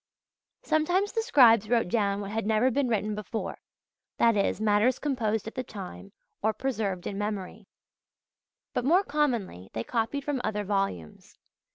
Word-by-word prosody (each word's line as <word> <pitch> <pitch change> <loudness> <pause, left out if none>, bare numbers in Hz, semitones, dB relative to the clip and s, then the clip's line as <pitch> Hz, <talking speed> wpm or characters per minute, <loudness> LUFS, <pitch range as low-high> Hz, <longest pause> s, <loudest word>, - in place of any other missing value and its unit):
Sometimes 350 +6 +1
the 455 - 0
scribes 230 - +5
wrote 235 -4 +2
down 200 0 0
what 200 0 -6
had 220 -1 -2
never 220 +4 +3
been 275 +1 +1
written 215 -2 0
before, 210 +1 -5 0.6
that 230 -1 +4
is, 200 0 +1
matters 215 +3 +3
composed 225 -7 -1
at 225 - -6
the 255 - -3
time, 195 -3 -9 0.3
or 220 +1 +2
preserved 215 -7 -2
in 200 - -4
memory; 205 -1 -4 1.1
but - - -1
more 345 +9 +4
commonly 235 - -1
they 110 - -3
copied 235 - -2
from 275 -3 -2
other 210 -1 -1
volumes. 195 - -3
220 Hz, 155 wpm, -28 LUFS, 205-260 Hz, 1.1 s, scribes